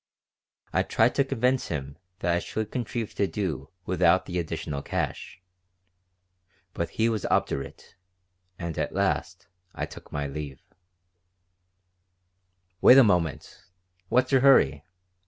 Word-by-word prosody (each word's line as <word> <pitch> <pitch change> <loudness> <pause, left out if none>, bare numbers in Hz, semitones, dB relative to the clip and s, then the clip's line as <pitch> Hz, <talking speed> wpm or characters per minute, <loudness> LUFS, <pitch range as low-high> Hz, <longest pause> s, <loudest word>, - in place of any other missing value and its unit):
I - - +3
tried 115 +2 +2
to 140 - +3
convince 130 0 0
him 70 -3 -5 0.3
that 85 - +1
I 85 - +2
should 110 +3 -4
contrive 120 -2 -3
to 100 - 0
do 80 -11 -3 0.2
without 90 0 +3
the 90 -1 -3
additional 75 -3 -4
cash. - - -4 1.3
But 85 -1 -2
he 115 - +3
was 110 -3 -1
obdurate, 70 - -2 0.6
and 85 -3 -5
at - - -2
last - - -1 0.3
I - - -2
took - - -13
my 75 0 -2
leave 70 -1 -6 2.2
"Wait 130 - +8
a 135 - +9
moment! 85 - 0 0.5
What's 130 +2 +2
your 135 -2 +4
hurry? 75 - +5
90 Hz, 125 wpm, -26 LUFS, 75-115 Hz, 2.2 s, a